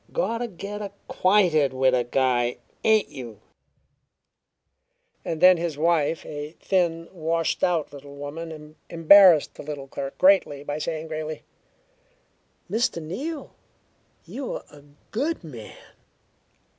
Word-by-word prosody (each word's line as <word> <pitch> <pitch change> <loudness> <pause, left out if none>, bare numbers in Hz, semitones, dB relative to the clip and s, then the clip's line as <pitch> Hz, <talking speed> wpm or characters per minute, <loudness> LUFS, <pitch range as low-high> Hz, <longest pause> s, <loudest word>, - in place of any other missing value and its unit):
"Gotta 240 - -1
get 205 +1 -7
acquainted 185 -7 +1
with 130 0 +2
a 125 -1 +2
guy, 120 -1 +1 0.3
ain't 220 -1 +3
you?" 120 -6 -9 1.8
Then 180 +3 +5
his 165 -3 -3
wife, 160 0 +1
a 150 +1 -7
thin, 170 -3 0
washed 165 -1 -1
out 170 -5 +1
little 140 0 -11
woman, 155 +1 -8
embarrassed 170 -1 +6
the - - -10
little 145 -2 -7
clerk 135 0 -6
greatly 185 -7 +3
by 145 +1 -4
saying 160 0 -4
gravely: 155 -1 -5 1.2
"Mr. 220 -1 0
Neal, 275 - -6 0.7
you're 270 -1 -6
a 145 -1 -15 0.3
good 285 - -2
man." 120 -9 -10
160 Hz, 110 wpm, -24 LUFS, 145-190 Hz, 1.8 s, embarrassed